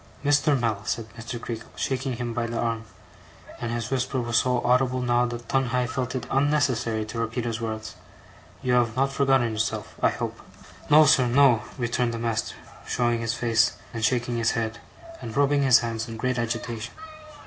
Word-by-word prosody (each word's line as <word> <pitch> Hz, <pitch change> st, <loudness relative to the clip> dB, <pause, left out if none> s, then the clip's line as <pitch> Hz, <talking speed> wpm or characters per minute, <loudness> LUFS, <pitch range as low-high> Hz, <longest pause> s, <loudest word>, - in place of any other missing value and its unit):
'Mr. 145 Hz, -1 st, +3 dB
Mell,' 110 Hz, -4 st, -1 dB
said 115 Hz, -, -2 dB
Mr. 115 Hz, +1 st, -6 dB
Creakle, 115 Hz, -1 st, -6 dB
shaking 130 Hz, 0 st, -2 dB
him 120 Hz, 0 st, -4 dB
by 115 Hz, 0 st, -1 dB
the 115 Hz, 0 st, -4 dB
arm; 115 Hz, -1 st, -1 dB, 0.7 s
and 120 Hz, -1 st, -3 dB
his 115 Hz, 0 st, -3 dB
whisper 130 Hz, 0 st, 0 dB
was 120 Hz, -1 st, 0 dB
so 125 Hz, -1 st, +1 dB
audible 125 Hz, +1 st, +3 dB
now, 120 Hz, 0 st, +2 dB
that 120 Hz, -1 st, -7 dB
Tungay 125 Hz, -1 st, +1 dB
felt 125 Hz, +1 st, -3 dB
it 125 Hz, -2 st, -3 dB
unnecessary 130 Hz, -6 st, +1 dB
to 115 Hz, +2 st, -6 dB
repeat 115 Hz, +1 st, -2 dB
his 115 Hz, -1 st, -3 dB
words; 110 Hz, -1 st, -4 dB, 0.7 s
'you 125 Hz, -, +1 dB
have 120 Hz, -2 st, +2 dB
not 135 Hz, +1 st, +1 dB
forgotten 135 Hz, -4 st, +3 dB
yourself, 110 Hz, 0 st, -2 dB
I -, -, +5 dB
hope?' -, -, -4 dB, 0.5 s
'No, 155 Hz, +1 st, +8 dB
sir, 130 Hz, -3 st, +5 dB
no,' 125 Hz, -2 st, +5 dB, 0.2 s
returned 120 Hz, -1 st, 0 dB
the -, -, -3 dB
Master, 115 Hz, -1 st, -2 dB, 0.3 s
showing 120 Hz, -1 st, +1 dB
his 115 Hz, 0 st, -1 dB
face, 115 Hz, -2 st, +2 dB, 0.2 s
and 115 Hz, -1 st, -4 dB
shaking 120 Hz, 0 st, +1 dB
his 115 Hz, -1 st, +1 dB
head, 115 Hz, 0 st, -2 dB, 0.4 s
and 115 Hz, -, -6 dB
rubbing 145 Hz, 0 st, +3 dB
his 130 Hz, -2 st, +6 dB
hands 115 Hz, 0 st, -3 dB
in 115 Hz, -1 st, -7 dB
great 125 Hz, +2 st, -1 dB
agitation. 115 Hz, -1 st, -4 dB
120 Hz, 180 wpm, -25 LUFS, 115-130 Hz, 0.7 s, No